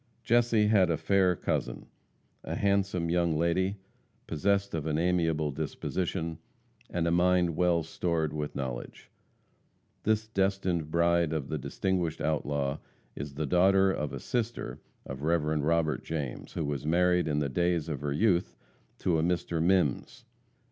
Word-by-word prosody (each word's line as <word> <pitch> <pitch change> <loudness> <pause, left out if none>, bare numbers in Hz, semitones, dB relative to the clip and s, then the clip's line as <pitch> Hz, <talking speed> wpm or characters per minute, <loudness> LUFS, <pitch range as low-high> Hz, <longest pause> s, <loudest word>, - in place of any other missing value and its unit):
Jesse 115 -2 +3
had 100 -4 +4
a 80 - +1
fair 95 +1 +2
cousin - - -2 0.6
a - - -4
handsome 100 -4 +1
young 85 -2 +2
lady, 95 +4 +1 0.5
possessed 100 +5 0
of 80 -1 -2
an 75 -1 0
amiable 80 -3 +1
disposition, 80 +3 -3 0.5
and 85 -1 -1
a 85 - +1
mind 90 -1 +3
well 85 -1 +2
stored 80 -1 -1
with 75 -1 -4
knowledge. 65 -3 -6 0.9
This 110 0 +1
destined 95 -6 0
bride 85 0 +2
of 75 -4 -3
the 80 - -2
distinguished 85 +4 -1
outlaw 70 -2 -1 0.4
is 70 0 -6
the 75 +1 -2
daughter 95 +5 +4
of 75 -5 -3
a - - -5
sister 120 -1 -3 0.2
of 65 - -6
the 70 - -5
Rev. 80 -2 +1
Robert 80 +1 +1
James, 75 -6 -5
who 80 - -2
was 70 -2 -3
married 90 +3 +2
in 75 -1 0
the 75 -1 +1
days 85 +1 0
of 75 -4 -4
her 75 -1 -2
youth 90 +3 +1 0.4
to 85 -3 +1
a - - +2
Mr. 85 -1 0
Mimms. 85 -6 +1
85 Hz, 150 wpm, -29 LUFS, 75-90 Hz, 0.9 s, had